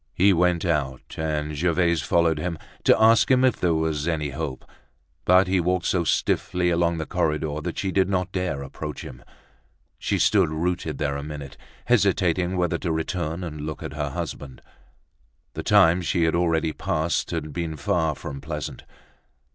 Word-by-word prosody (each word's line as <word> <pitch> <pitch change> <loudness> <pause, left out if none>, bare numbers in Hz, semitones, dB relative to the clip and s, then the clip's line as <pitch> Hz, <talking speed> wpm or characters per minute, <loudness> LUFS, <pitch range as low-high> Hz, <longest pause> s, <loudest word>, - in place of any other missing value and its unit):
He 100 +2 +5
went 90 0 +2
out 70 -6 -2
and 75 -1 -2
Gervaise 85 0 +1
followed 80 0 +2
him, 85 +1 -3 0.3
to - - +5
ask 115 +1 +5
him 130 0 +5
if 130 - +2
there 85 -2 +1
was 80 -1 -1
any 75 -4 -1
hope. 70 -1 -5 0.6
But 90 +1 +6
he 95 0 +2
walked 90 +1 0
so 90 -2 +1
stiffly 90 +1 +1
along 85 0 +1
the 80 - -3
corridor, 75 -1 -1
that 85 +2 -5
she 95 - -1
did 95 0 +2
not 95 -1 -1
dare 90 -7 -2
approach 75 +2 -7
him. 65 -1 -10 0.8
She - - 0
stood - - +3
rooted 80 -1 -2
there 70 -2 -1
a - - -4
minute, 75 -2 -7 0.3
hesitating 95 -5 +2
whether 90 -1 0
to 85 - -2
return 80 +1 -2
and 75 -3 -6
look 75 +1 -5
at - - -6
her 75 -1 -2
husband. 70 -3 -6 0.9
The - - -4
time 85 +2 +5
she 85 0 0
had 80 - +2
already 80 -2 +1
passed 80 +3 -1
had 75 -3 -4
been 80 -2 -3
far 80 +2 0
from 70 0 -7
pleasant. 75 -2 -6
80 Hz, 170 wpm, -24 LUFS, 75-90 Hz, 0.9 s, But